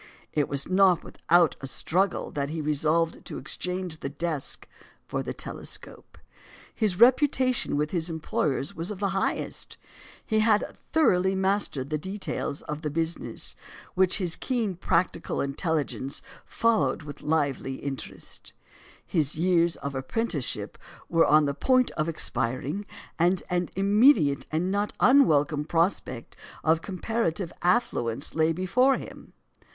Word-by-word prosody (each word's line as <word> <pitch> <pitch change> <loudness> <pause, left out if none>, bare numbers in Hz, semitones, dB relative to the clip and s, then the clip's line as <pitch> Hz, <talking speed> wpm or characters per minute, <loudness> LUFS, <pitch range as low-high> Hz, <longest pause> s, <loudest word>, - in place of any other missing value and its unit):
It 150 -2 +1
was 140 -1 0
not 185 -2 +4
without 170 -2 +2
a 135 - -4
struggle 185 +8 0
that 140 -1 -2
he 160 +1 -4
resolved 155 +2 0
to - - -6
exchange 180 -3 -4
the 135 - -4
desk 150 -1 -3 0.4
for - - -3
the - - -4
telescope. - - -7 0.6
His 205 -6 0
reputation 255 - +4
with 150 +1 0
his 170 -2 0
employers 150 -3 -1
was 165 +2 -4
of 210 - -5
the 200 +1 0
highest; 195 0 -3 0.5
he 220 -1 +1
had 215 -1 +2 0.2
thoroughly 190 - +3
mastered 190 -8 0
the 155 - 0
details 190 -5 -4
of 150 0 -5
the 155 - -2
business, 160 -6 -2 0.4
which 185 0 +3
his 180 -5 -1
keen 235 -7 -1
practical 170 -1 -1
intelligence 140 -1 -2 0.2
followed 160 -11 +1
with 145 -1 -9
lively 145 -4 0
interest; 135 0 -7 0.5
his 150 -4 +1
years 170 0 +2
of 140 0 -5
apprenticeship 145 - -2 0.3
were 165 -1 +4
on 155 0 +5
the 140 - 0
point 255 - +2
of 155 +1 -2
expiring, 150 - -2 0.3
and 175 +2 +3
an 180 0 0
immediate, 200 - +4
and 170 +4 0
not 205 +1 0
unwelcome 155 - +4
prospect 165 -7 -1 0.3
of 160 +1 +3
comparative 195 -2 -2
affluence 140 - +1
lay 160 0 +2
before 230 +11 +2
him. - - -11
165 Hz, 135 wpm, -27 LUFS, 150-195 Hz, 0.6 s, on